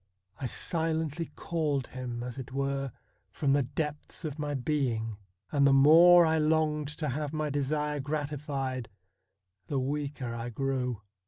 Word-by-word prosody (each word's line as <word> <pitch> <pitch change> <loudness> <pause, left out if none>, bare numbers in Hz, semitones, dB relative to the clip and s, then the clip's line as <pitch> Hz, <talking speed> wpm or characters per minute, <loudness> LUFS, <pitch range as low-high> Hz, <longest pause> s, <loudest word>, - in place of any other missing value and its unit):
I 130 - -2
silently 160 +2 -1
called 150 -6 -1
him, 125 -2 -5
as 125 +1 -6
it 130 -1 -7
were, 135 0 -1 0.4
from 135 +7 +1
the 145 - +4
depths 150 +5 -4
of 150 0 -4
my 145 -1 -2
being, 125 -6 -1 0.3
and 140 -1 +4
the 135 - +5
more 165 +5 +8
I 160 0 +2
longed 155 -1 +2
to 150 -2 -2
have 145 +3 -3
my 155 -1 -1
desire 150 +1 -1
gratified 140 -3 -3 0.8
the 140 - -1
weaker 140 -2 -2
I 115 +1 -4
grew. 125 -3 -2
145 Hz, 145 wpm, -30 LUFS, 130-150 Hz, 0.8 s, more